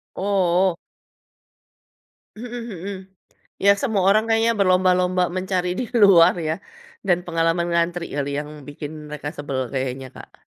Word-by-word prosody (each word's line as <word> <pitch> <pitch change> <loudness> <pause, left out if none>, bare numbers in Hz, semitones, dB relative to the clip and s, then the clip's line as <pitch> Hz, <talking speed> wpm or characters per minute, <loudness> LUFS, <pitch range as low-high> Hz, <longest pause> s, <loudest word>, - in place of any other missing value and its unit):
Oh. 190 -2 +1 1.6
Mhm 245 +1 -6
mhm. 195 0 -6 0.6
Ya 200 +1 +5
semua 220 -8 0
orang 215 +2 +4
kayaknya 225 +1 +3
berlomba-lomba 185 -1 +3
mencari 185 -1 -1
di 250 - -1 0.2
luar 180 -3 +7
ya 155 - +1 0.5
dan 175 -2 +4
pengalaman 165 +1 +1
ngantri 170 0 0
kali 145 -1 -2
yang 150 0 -7 0.2
bikin 145 +1 -7 0.2
mereka 150 -1 -5
sebel 140 -2 -4
kayaknya, 130 0 -3
Kak. - - -14
180 Hz, 125 wpm, -22 LUFS, 165-195 Hz, 1.6 s, luar